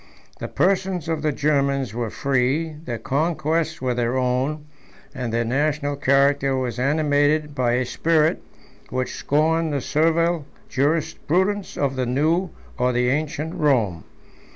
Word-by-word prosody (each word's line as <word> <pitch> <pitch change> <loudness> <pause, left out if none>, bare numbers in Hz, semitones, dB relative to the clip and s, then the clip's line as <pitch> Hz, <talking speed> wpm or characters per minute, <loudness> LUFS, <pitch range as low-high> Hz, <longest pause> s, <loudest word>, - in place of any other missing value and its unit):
The - - -4
persons 185 -3 0
of 160 -2 -1
the 155 0 +1
Germans 140 -4 0
were 120 -1 -2
free, 140 +6 0
their 120 -2 -3
conquests 155 +4 -1
were 125 -1 +1
their 120 +1 0
own, 130 +4 -1 0.5
and 125 -3 -4
their 115 +1 0
national 145 +3 0
character 140 0 +2
was 125 -2 -3
animated 145 +2 +2
by 125 -3 +1
a 125 +1 +1
spirit 160 +4 +1 0.5
which 130 +1 -2
scorned 160 +2 +1
the 140 - 0
servile 165 +2 +1 0.2
jurisprudence 165 +7 0
of 140 -2 0
the 130 -1 0
new 160 +8 +1 0.3
or 125 0 +2
the 125 0 +2
ancient 150 +3 -2
Rome. 125 - +1
145 Hz, 135 wpm, -22 LUFS, 130-160 Hz, 0.5 s, character